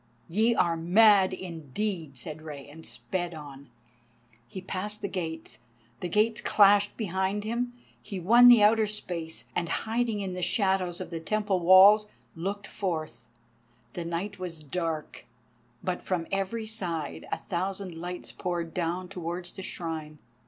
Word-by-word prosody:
"Ye 220 +7 +3
are 170 -5 +2
mad 190 +3 +5
indeed," 170 -2 -4
said 155 +4 -7
Rei, 150 -3 -8
and 155 +3 -12
sped 125 +10 -4
on. 140 -3 -10 0.8
He 190 - -7
passed 205 +3 -4
the - - 0
gates, 165 -4 -5 0.4
the 180 - -4
gates 215 +4 +2
clashed 205 0 +4
behind 190 0 -1
him. 240 +3 -2 0.3
He 200 -3 -6
won 235 +8 +7
the 240 -4 +8
outer 215 +1 +5
space, 175 -6 -4
and 170 -1 -1
hiding 225 +2 -1
in 195 -2 -3
the 180 - -4
shadows 190 -2 +1
of - - -7
the 165 - -3
Temple 205 +2 0
walls, 190 +4 +7 0.3
looked 200 +4 -4
forth. 155 - -4 0.7
The 175 - -4
night 180 +4 -4
was 170 -4 -6
dark, 160 -4 -4 0.6
but 180 -1 -2
from 180 -3 -2
every 195 +3 -1
side 175 -8 -4
a - - 0
thousand 190 0 -3
lights 175 +2 -6
poured 170 -2 -3
down 180 +1 -2
towards 175 -1 -5
the - - -9
Shrine. 160 -4 -5
185 Hz, 145 wpm, -28 LUFS, 165-205 Hz, 0.8 s, the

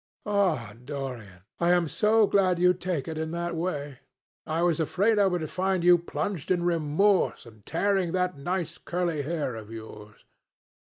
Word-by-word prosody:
"Ah, 180 - 0
Dorian, 125 -10 -7 0.2
I 170 - +2
am 175 -2 +2
so 215 +6 +3
glad 190 -3 +2
you 180 +1 +4
take 180 -5 -3
it 160 -1 -4
in 160 0 -2
that 170 0 -2
way! 145 -6 -3 0.5
I 160 +2 0
was 170 -3 +2
afraid 200 +7 +2
I 200 - +5
would 175 -4 -1
find 185 0 -1
you 175 0 +6
plunged 170 +1 -4
in 180 -2 +2
remorse 175 +3 +2
and 110 -3 -16
tearing 190 0 +1
that 180 -1 0
nice 170 +3 -3
curly 170 -4 -2
hair 145 -3 -2
of 110 -1 -9
yours." 110 -2 -11
170 Hz, 165 wpm, -27 LUFS, 145-185 Hz, 0.5 s, you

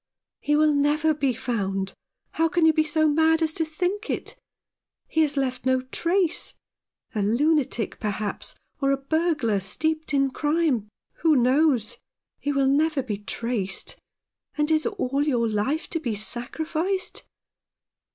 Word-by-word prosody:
" - - -66
He 295 - +1
will 305 0 +4
never 300 +2 +2
be 280 -3 0
found. 195 -5 -2 0.4
How 325 - +2
can 340 0 +2
you 320 - +6
be 310 - +3
so 310 0 +2
mad 320 +2 +3
as 315 -1 0
to 325 - 0
think 360 +7 -3
it? - - -3 0.7
He 320 - +1
has 295 -2 +1
left 255 -2 -1
no 260 0 +2
trace 335 +7 0 0.3
— - - -46
a 215 - -1
lunatic, 240 +1 +1
perhaps, 210 -1 -3 0.3
or 275 - +2
a 275 - +2
burglar, 295 - 0
steeped 315 - -1
in 275 -2 +2
crime. 295 -8 0 0.3
Who 315 -2 +3
knows? 255 -2 +2 0.4
He 290 - -1
will 275 -1 +2
never 290 +1 +2
be 210 -5 -4
traced. 210 -2 -3 0.6
And 300 +1 +1
is 315 +4 +2
all 285 - -1
your 250 -6 +1
life 220 +9 -1
to 330 - -1
be 240 -8 -2
sacrificed 315 - -1
290 Hz, 150 wpm, -25 LUFS, 240-315 Hz, 0.7 s, you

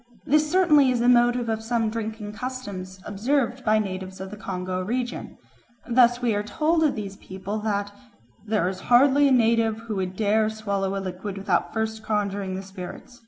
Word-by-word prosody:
This 300 +1 +3
certainly 305 -7 +5
is 250 -2 +1
the 240 - +2
motive 240 0 +4
of 220 -1 -1
some 225 -1 0
drinking 220 -2 -5
customs 205 -7 -6
observed 250 +4 -1
by 215 -2 +3
natives 190 -2 -4
of 190 0 -7
the - - -6
Congo 185 -2 -4
region. 245 +5 -3 0.5
Thus 245 0 +4
we 235 -2 +2
are 205 - 0
told 310 +10 +1
of 300 - +2
these 200 -2 -6
people 190 +3 -6
that 205 -1 -2 0.5
"there 210 -4 0
is 185 0 -3
hardly 275 +3 +6
a - - +2
native 230 -3 +3
who 225 -3 -4
would 185 -1 -3
dare 215 +1 +2
to 220 - -8
swallow 200 -2 -2
a - - -1
liquid 190 +1 -5
without 195 - 0
first 220 0 -2
conjuring 200 -3 -2
the 190 - -5
spirits. 195 +5 -9
220 Hz, 185 wpm, -25 LUFS, 195-245 Hz, 0.5 s, hardly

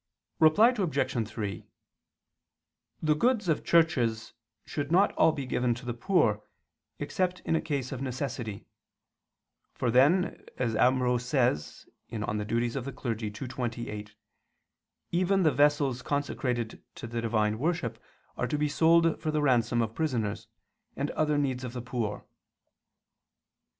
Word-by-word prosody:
Reply 160 +9 +6
Obj. 140 - 0
3: 105 -5 -4 1.4
The 155 -1 +4
goods 220 +4 +1
of 160 - +1
churches 120 -9 +2 0.3
should 145 +1 -4
not 190 +4 +5
all 160 - +4
be 140 -3 -5
given 125 -1 0
to 125 +2 -10
the 120 - -2
poor, 120 - +2 0.6
except 180 +5 -2
in - - 0
a - - +1
case 140 -4 -3
of 135 -2 -5
necessity: 125 -5 -4 1.1
for 120 - 0
then, 150 +10 +3
as 115 -3 -1
Ambrose 125 0 +2
says 125 - 0 0.2
(De 115 - -5
Offic. 115 +3 -2
ii, 110 - -2
28), 115 -2 -5 1.0
even 185 +2 +2
the 155 - +4
vessels 145 -2 +2
consecrated 125 -5 -2
to - - -7
the 115 0 -3
divine 110 -1 0
worship 165 -6 -1 0.4
are 125 - -1
to 150 - -1
be 150 0 +1
sold 165 +2 +3
for 155 - -2
the 155 -1 0
ransom 120 -3 +3
of 110 0 -4
prisoners, 120 -9 -2 0.5
and 140 +2 -2
other 150 -1 +1
needs 130 -3 -1
of 125 -2 -5
the 125 - -4
poor. 115 -4 -3
130 Hz, 135 wpm, -29 LUFS, 115-155 Hz, 1.4 s, Reply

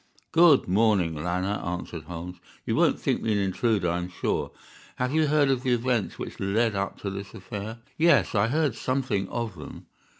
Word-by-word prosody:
"Good 165 -4 +6
morning, 95 -3 +3
Lanner," 90 +6 -2
answered 85 -2 -5
Holmes; 90 +1 -7 0.3
"you - - 0
won't - - +3
think - - 0
me 110 - 0
an - - +1
intruder, 100 0 +1
I 85 +1 0
am 90 0 -5
sure. 90 - -2 0.5
Have 125 +2 -1
you 155 -1 +3
heard 145 -1 +3
of 130 -2 0
the 130 -1 +1
events 120 -3 0
which - - -7
led 105 +3 +1
up 100 0 -3
to 100 - -3
this 100 +1 -7
affair?" 105 +4 -6 0.2
"Yes, 170 +1 +4
I 105 0 +3
heard 150 0 +1
something 130 -6 -1
of 115 -5 -3
them." 75 - -10
105 Hz, 190 wpm, -26 LUFS, 90-125 Hz, 0.5 s, Good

